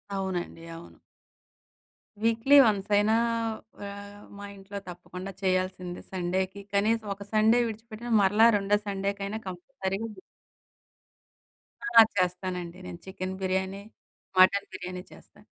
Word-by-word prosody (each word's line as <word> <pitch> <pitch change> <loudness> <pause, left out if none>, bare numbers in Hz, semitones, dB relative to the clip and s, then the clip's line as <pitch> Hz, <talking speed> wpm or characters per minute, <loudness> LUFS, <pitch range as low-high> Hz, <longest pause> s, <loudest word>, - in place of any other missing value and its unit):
అవునండి. 180 -3 -3
అవును. 170 - -13 1.2
వీక్లీ 230 +5 +4
వన్సయినా 205 +1 +2 0.7
ఆహ్, 200 0 -8 0.2
మా 205 - -7
ఇంట్లో 200 +1 -8
తప్పకుండా 180 +2 -8
చేయాల్సిందే 185 -1 -1
సండేకి 190 +2 -2
కనీసం 220 +2 +2
ఒక 200 +1 -10
సండే 220 +3 +5
విడిచిపెట్టిన, 225 +2 -7
మరలా 210 +4 +6
రెండో 200 +1 +2
సండే‌కైనా 200 +1 -2
కంపల్సరీగ 190 +2 -4 1.8
ఆ! 235 -1 +7
చేస్తానండి 180 -1 -2
నేను 170 - -8
చికెన్ 190 0 -5
బిర్యానీ, 190 +1 -1 0.6
మటన్ 195 +2 +6
బిర్యానీ 180 0 -6
చేస్తాను. - - -17
195 Hz, 100 wpm, -28 LUFS, 185-210 Hz, 1.8 s, ఆ